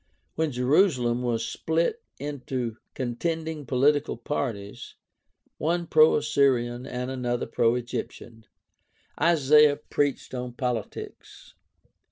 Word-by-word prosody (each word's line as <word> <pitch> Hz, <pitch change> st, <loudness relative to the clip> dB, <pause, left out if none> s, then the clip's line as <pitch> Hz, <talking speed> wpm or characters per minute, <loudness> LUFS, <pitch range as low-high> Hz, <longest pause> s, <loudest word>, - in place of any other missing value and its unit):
When 160 Hz, -1 st, -1 dB
Jerusalem 125 Hz, -2 st, +2 dB
was 115 Hz, -2 st, -1 dB
split 165 Hz, -, -1 dB, 0.2 s
into 130 Hz, -5 st, -4 dB, 0.2 s
contending 155 Hz, +4 st, -3 dB
political 140 Hz, +3 st, +2 dB
parties, 110 Hz, -5 st, -4 dB, 0.6 s
one 170 Hz, +2 st, 0 dB
pro 155 Hz, -1 st, +5 dB
Assyrian 120 Hz, -1 st, +1 dB
and 125 Hz, +1 st, -4 dB
another 120 Hz, -2 st, -2 dB
pro 115 Hz, 0 st, +2 dB
Egyptian, 120 Hz, -2 st, -6 dB, 0.8 s
Isaiah 150 Hz, -2 st, +5 dB
preached 145 Hz, -2 st, -2 dB
on 125 Hz, -1 st, -4 dB
politics. 120 Hz, -3 st, -5 dB
130 Hz, 95 wpm, -26 LUFS, 120-150 Hz, 0.8 s, pro